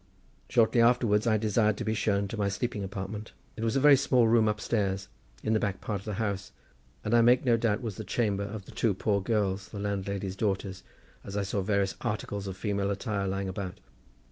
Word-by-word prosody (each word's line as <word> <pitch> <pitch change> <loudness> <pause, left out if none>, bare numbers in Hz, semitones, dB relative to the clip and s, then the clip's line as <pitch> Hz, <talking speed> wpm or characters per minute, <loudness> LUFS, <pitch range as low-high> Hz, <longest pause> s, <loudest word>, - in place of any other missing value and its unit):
Shortly 115 0 +4
afterwards 115 -2 +3
I 110 -1 +4
desired 110 0 +2
to - - -3
be 110 - +1
shown 100 -2 +1
to - - -4
my 100 -2 0
sleeping 105 +1 -2
apartment. 100 +2 -6 0.2
It 110 - -5
was 115 -1 0
a - - +4
very 145 +1 +8
small 125 -3 +3
room 110 -1 +4
upstairs, 100 -3 -1 0.3
in 110 - +1
the 110 - +3
back 100 -2 -2
part 105 -3 -3
of - - -17
the 105 -2 -3
house; 100 -1 -2 0.5
and 105 - -1
I 120 - +6
make 120 +3 +4
no 120 -2 +5
doubt 115 0 0
was 110 -5 -4
the 110 - -5
chamber 100 -1 0
of 100 -1 -7
the - - -12
two 110 -5 +1
poor 100 0 +1
girls, 95 -2 0
the 105 - -8
landlady's 100 -1 -3
daughters, 95 -2 -2 0.4
as 100 +1 -6
I 100 - +1
saw 100 +1 -1
various 100 0 0
articles 105 -3 -3
of 95 -1 -5
female 100 -1 -1
attire 100 0 -2
lying 95 0 -2
about. 95 -1 -5
105 Hz, 215 wpm, -29 LUFS, 100-110 Hz, 0.5 s, very